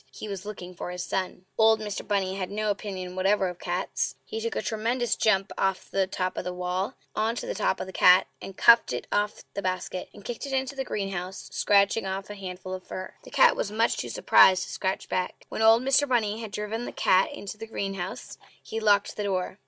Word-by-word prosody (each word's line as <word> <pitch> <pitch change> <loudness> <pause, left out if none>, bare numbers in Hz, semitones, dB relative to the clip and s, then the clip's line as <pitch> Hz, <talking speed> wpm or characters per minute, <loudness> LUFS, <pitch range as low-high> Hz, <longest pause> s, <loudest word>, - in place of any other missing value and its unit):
He - - -8
was 200 -1 -6
looking 185 -4 -7
for 180 - -6
his 180 0 -4
son. 185 -1 -3
Old 220 0 +6
Mr. 210 -2 -4
Bunny 195 -2 0
had 190 -2 -3
no 210 +1 -1
opinion 190 -3 -5
whatever 190 0 +2
of 180 0 -9
cats. 180 +1 -2
He 220 - -5
took 230 0 -3
a - - 0
tremendous 230 +2 0
jump 195 -3 +2
off 195 -1 -1
the 195 -1 +1
top 185 -1 -3
of - - -2
the 180 - -3
wall 180 +2 -2 0.2
on 220 +2 +1
to - - -4
the - - -3
top 210 - 0
of - - -3
the 190 - -10
cat, 180 +1 +6 0.2
and 195 - -9
cuffed 235 - +6
it 125 - -3
off 205 0 0
the 200 - -3
basket, 185 -1 -3
and 205 - -15
kicked 240 +4 -5
it 270 - -5
into 265 +1 -1
the 270 - -2
greenhouse, 195 -4 -4
scratching 200 +1 +3
off 190 +1 -4
a - - -4
handful 185 -1 -7
of 185 0 -6
fur. 185 +1 -7
The - - -13
cat - - +5
was - - -1
too 210 - -8
much 225 +1 +2
surprised 185 -1 +5
to - - -7
scratch 190 0 -2
back. 180 0 -3
When - - -4
old 225 +2 +6
Mr. 270 +2 +3
Bunny 225 -3 +1
had 220 - -6
driven 210 +3 -3
the - - -5
cat 185 +1 +3
into 205 +1 -8
the 225 - -7
greenhouse, 195 -4 -5 0.2
he 225 - -4
locked 205 -2 +3
the 210 - -3
door. 190 0 -2
200 Hz, 230 wpm, -27 LUFS, 185-220 Hz, 0.2 s, Old